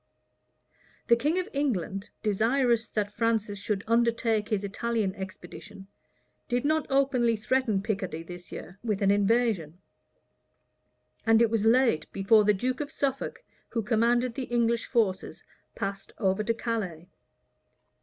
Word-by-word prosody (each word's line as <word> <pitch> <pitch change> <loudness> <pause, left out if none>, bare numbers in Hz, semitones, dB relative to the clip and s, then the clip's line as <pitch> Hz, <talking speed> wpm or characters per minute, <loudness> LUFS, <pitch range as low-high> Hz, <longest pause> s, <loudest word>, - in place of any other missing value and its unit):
The 235 - +8
king 295 +9 0
of 370 - -1
England, 205 - -2
desirous 230 +3 +2
that 205 -1 -2
Francis 215 -3 0
should 200 0 -2
undertake 230 -2 +1
his 210 -3 0
Italian 210 0 -1
expedition, 190 +1 -9 0.6
did 245 +2 -1
not 310 +1 +1
openly 265 -4 +2
threaten 215 -2 0
Picardy 190 -6 -3
this 175 +1 -10
year 185 +3 -9
with 210 -4 -1
an 195 - +4
invasion; 205 -5 +1 1.5
and 225 -1 +5
it 230 -2 +3
was 225 -2 +1
late 235 -7 +3
before 205 +2 +4
the 210 - +5
duke 255 +7 -2
of 290 - -4
Suffolk, 275 - -3 0.3
who 230 - -2
commanded 235 +2 +2
the 260 +1 -4
English 235 -1 0
forces, 210 -6 -1 0.3
passed 195 0 -5
over 195 0 +1
to 230 +2 +1
Calais. 195 -9 -3
225 Hz, 135 wpm, -28 LUFS, 200-240 Hz, 1.5 s, The